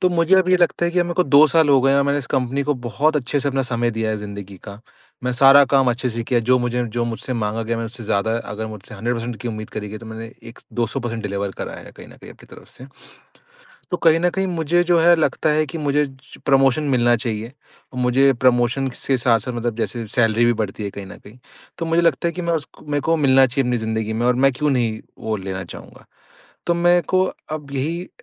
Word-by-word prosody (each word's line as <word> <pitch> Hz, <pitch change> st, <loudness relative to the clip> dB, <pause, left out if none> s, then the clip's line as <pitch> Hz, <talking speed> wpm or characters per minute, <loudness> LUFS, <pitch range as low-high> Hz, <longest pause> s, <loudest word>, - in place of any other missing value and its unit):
तो 185 Hz, -, +3 dB
मुझे 170 Hz, +1 st, +3 dB
अब 185 Hz, -1 st, +2 dB
ये 185 Hz, -, +5 dB
लगता 175 Hz, 0 st, +1 dB
है 170 Hz, -, +1 dB
कि 180 Hz, -, 0 dB
अब 175 Hz, -, +3 dB
मेरे 175 Hz, 0 st, -4 dB
को 180 Hz, -, +3 dB
2 145 Hz, +3 st, +6 dB
साल 160 Hz, -2 st, +3 dB
हो 135 Hz, -2 st, +5 dB
गए 135 Hz, +1 st, +3 dB
और 140 Hz, -, +4 dB
मैंने 140 Hz, +1 st, +1 dB
इस 135 Hz, -, -6 dB
कंपनी 130 Hz, +2 st, -1 dB
को 150 Hz, +1 st, 0 dB
बहुत 150 Hz, +5 st, +1 dB
अच्छे 145 Hz, +1 st, -1 dB
से 140 Hz, -, -1 dB
अपना 135 Hz, 0 st, 0 dB
समय 120 Hz, -1 st, -1 dB
दिया 110 Hz, -1 st, -2 dB
है 110 Hz, -, -1 dB
जिंदगी 100 Hz, -1 st, -8 dB
का, 100 Hz, +2 st, -10 dB, 0.4 s
मैं 125 Hz, -, 0 dB
सारा 135 Hz, +2 st, +7 dB
काम 135 Hz, -1 st, +3 dB
अच्छे 125 Hz, +2 st, -2 dB
से 115 Hz, +1 st, -4 dB
किया 120 Hz, 0 st, +1 dB
जो 130 Hz, 0 st, +5 dB
मुझे 120 Hz, 0 st, -1 dB
जो 120 Hz, 0 st, 0 dB
मुझसे 120 Hz, +2 st, -4 dB
माँगा 115 Hz, -1 st, -2 dB
गया 115 Hz, +1 st, -2 dB
मैं 115 Hz, -, -3 dB
उससे 115 Hz, 0 st, -8 dB
ज्यादा 100 Hz, +2 st, 0 dB, 0.2 s
अगर 110 Hz, +2 st, -4 dB
मुझसे 110 Hz, -1 st, -10 dB
100% 115 Hz, +2 st, -3 dB
की 120 Hz, -, -4 dB
उम्मीद 110 Hz, -1 st, -6 dB
करी 105 Hz, -1 st, -6 dB
गई 110 Hz, -, -7 dB
तो 115 Hz, -, -12 dB
मैंने 110 Hz, +1 st, -7 dB, 0.2 s
एक 115 Hz, -, -13 dB, 0.2 s
200 120 Hz, +3 st, -1 dB
परसेंट 115 Hz, -2 st, -4 dB
डिलीवर 100 Hz, -1 st, -3 dB
करा -, -, -5 dB
है -, -, -12 dB
कहीं -, -, -11 dB
न -, -, -16 dB
कहीं -, -, -11 dB
अपनी -, -, -19 dB
तरफ -, -, -16 dB
से। 130 Hz, -, -13 dB, 1.1 s
तो 180 Hz, -, 0 dB
कहीं 165 Hz, -1 st, +4 dB
न 175 Hz, +1 st, +2 dB
कहीं 190 Hz, +2 st, -2 dB
मुझे 175 Hz, 0 st, +1 dB
जो 175 Hz, -1 st, +3 dB
है 175 Hz, +1 st, +6 dB
लगता 155 Hz, -1 st, 0 dB
है 155 Hz, +1 st, +2 dB
कि 155 Hz, +3 st, -7 dB
मुझे 145 Hz, 0 st, +1 dB
जो 135 Hz, 0 st, -15 dB
प्रमोशन 135 Hz, +1 st, +3 dB
मिलना 120 Hz, 0 st, +3 dB
चाहिए। 110 Hz, -1 st, -4 dB, 0.5 s
अ, -, -, -11 dB
मुझे 125 Hz, +2 st, +3 dB
प्रमोशन 125 Hz, +1 st, +1 dB
से 130 Hz, +1 st, -1 dB
साथ-साथ 120 Hz, 0 st, +1 dB
मतलब 120 Hz, -1 st, -3 dB
जैसे 115 Hz, 0 st, -3 dB
सैलरी 115 Hz, 0 st, +3 dB
भी 120 Hz, -, +3 dB
बढ़ती 105 Hz, 0 st, -5 dB
है 100 Hz, -, -3 dB
कहीं 100 Hz, 0 st, -9 dB
न 95 Hz, -, -11 dB
कहीं, 105 Hz, +5 st, -16 dB, 0.4 s
तो 165 Hz, -, -3 dB
मुझे 165 Hz, +1 st, +2 dB
लगता 170 Hz, 0 st, +1 dB
है -, -, -1 dB
कि 180 Hz, -, -5 dB
मैं 170 Hz, 0 st, -1 dB
उस 155 Hz, -3 st, -2 dB
क -, -, -16 dB
मेरे 145 Hz, 0 st, 0 dB
को 165 Hz, +4 st, +1 dB
मिलना 135 Hz, -3 st, +5 dB
चाहिए 135 Hz, +2 st, -1 dB
अपनी 125 Hz, -, +1 dB
जिंदगी 110 Hz, 0 st, -2 dB
में 115 Hz, +2 st, -1 dB
और 125 Hz, 0 st, +3 dB
मैं 135 Hz, -, +5 dB
क्यों 150 Hz, +4 st, -1 dB
नहीं 115 Hz, -5 st, 0 dB, 0.2 s
वो 110 Hz, -1 st, -2 dB
लेना 95 Hz, -1 st, -5 dB
चाहूँगा? 85 Hz, -, -12 dB, 0.6 s
तो 170 Hz, -, +3 dB
मेरे 175 Hz, +1 st, +3 dB
को 185 Hz, 0 st, +4 dB, 0.3 s
अब 150 Hz, -3 st, -6 dB
यही 160 Hz, +7 st, -3 dB
125 Hz, 255 wpm, -20 LUFS, 115-150 Hz, 1.1 s, सारा